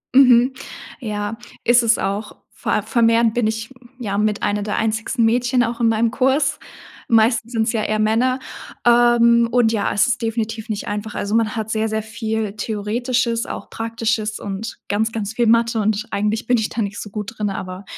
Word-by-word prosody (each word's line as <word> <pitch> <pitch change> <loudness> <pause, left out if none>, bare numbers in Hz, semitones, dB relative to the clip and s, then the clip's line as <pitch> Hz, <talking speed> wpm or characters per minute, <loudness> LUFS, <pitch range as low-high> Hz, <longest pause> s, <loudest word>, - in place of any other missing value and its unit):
Mhm, 255 -1 +6 0.5
ja, 210 -2 -4 0.3
isses 235 -1 +4
auch. 200 +2 -3 0.2
Vor - - -3
a - - +2
vermehrend 230 0 +3
bin 240 -2 +1
ich, 220 +3 -4 0.3
ja, 200 -4 -3
mit 210 -1 0
einer 205 0 0
der 210 +1 -2
einzigsten 225 +2 0
Mädchen 245 +2 +2
auch 235 0 -3
in 235 - +3
meinem 225 +1 +2
Kurs. 270 +4 +1 0.5
Meistens 225 0 +3
sind's 225 0 +1
ja 220 -2 0
eher 215 0 0
Männer, 235 +5 +2 0.5
ähm, 235 -1 +5
und, 240 -2 +3
ja, 215 -3 0
es 205 - +3
ist 245 - -1
definitiv 225 -1 -3
nicht 215 -1 -4
einfach. 210 +1 -4
Also, 200 +1 -3
man 225 -1 +1
hat 220 -1 -3
sehr, 220 0 0
sehr 220 0 -2
viel 220 -1 -3
theoretisches, 230 +3 -1
auch - - -7
praktisches 225 -1 -2
und 200 +3 -5
ganz, 220 +2 0
ganz 215 -1 -4
viel 235 +1 +1
Mathe, 230 0 +3
und 215 0 0
eigentlich 210 +3 -1
bin 245 - +3
ich 220 - -1
da 230 - -3
nicht 200 0 -5
so 210 - -8
gut 210 +2 -6
drin, 210 -1 -1
aber 185 0 -6
225 Hz, 185 wpm, -20 LUFS, 215-235 Hz, 0.5 s, Mhm